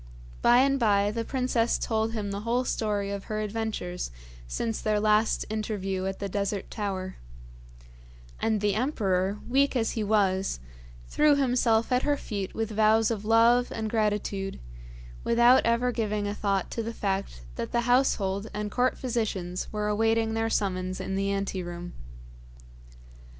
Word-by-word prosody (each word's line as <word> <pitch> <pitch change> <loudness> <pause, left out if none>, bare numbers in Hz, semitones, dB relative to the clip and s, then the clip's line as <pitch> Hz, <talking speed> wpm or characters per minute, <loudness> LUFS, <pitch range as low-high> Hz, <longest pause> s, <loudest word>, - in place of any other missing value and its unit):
By 240 - +6
and 275 0 +2
by 205 -3 +3
the 230 +1 -2
princess 250 -2 0
told 220 0 -1
him 205 -3 -3
the 200 - -3
whole 235 +4 0
story 205 -4 -1
of 200 -1 -5
her 215 0 -3
adventures 215 -4 -3 0.4
since 225 - -2
their 215 -1 +1
last 215 +1 +2
interview 200 -3 -2
at 195 - -3
the 200 - -3
Desert 200 0 -3
Tower; 190 -3 -4 1.2
and 220 -2 0
the 205 -1 +2
emperor, 200 -5 0
weak 275 +2 +2
as 225 -3 +1
he 220 - -2
was, 195 - +1 0.5
threw 300 -1 +4
himself 245 -4 +2
at 250 0 +3
her 290 0 +1
feet 200 -7 -5
with 225 0 -2
vows 220 +1 +3
of 210 -2 -3
love 230 +2 +4
and 220 -1 -3
gratitude, 210 -3 -1 0.6
without 240 +2 +5
ever 235 +2 +2
giving 210 -3 -1
a 205 - -2
thought 200 -2 -1
to 230 - -2
the 230 +1 -5
fact 195 - -2
that 115 - -4
the 235 - +1
household 220 -5 +1
and 210 0 -3
court 250 0 +1
physicians 205 -8 -3
were 210 -1 -2
awaiting 225 +1 +1
their 225 0 0
summons 185 -3 -1
in 190 0 -4
the 195 0 0
ante 195 -1 -2
room. 175 0 -7
215 Hz, 155 wpm, -27 LUFS, 200-230 Hz, 1.2 s, By